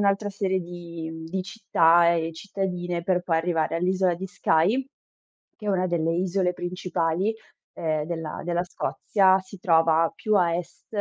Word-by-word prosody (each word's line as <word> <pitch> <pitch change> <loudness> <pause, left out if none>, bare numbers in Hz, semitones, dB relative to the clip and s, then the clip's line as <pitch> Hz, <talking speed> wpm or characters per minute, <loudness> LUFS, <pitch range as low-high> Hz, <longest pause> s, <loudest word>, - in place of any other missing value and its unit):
un'altra 200 +1 +1
serie 190 -1 -1
di 170 -2 -7
mhmm, 160 0 -8
di 185 +3 -3
città 170 -4 +4
e 165 0 -1
cittadine, 180 -1 -3
per 180 0 +1
poi 170 -2 +1
arrivare 165 -1 0
all'isola 185 +1 +1
di 185 +3 -6
Skye, 195 +9 +1 0.7
che 210 - -9
è - - 0
una 185 -1 +1
delle 165 -2 0
isole 180 +1 +1
principali, 175 +2 -1 0.4
ehm, 155 -2 -1
della 165 -2 -5
della 175 +1 0
Scozia. 190 +1 +2
Si 190 +1 -13
trova 165 -2 +3
più 215 - -1
a 175 -3 +3
est 175 - -8
175 Hz, 160 wpm, -25 LUFS, 165-190 Hz, 0.7 s, città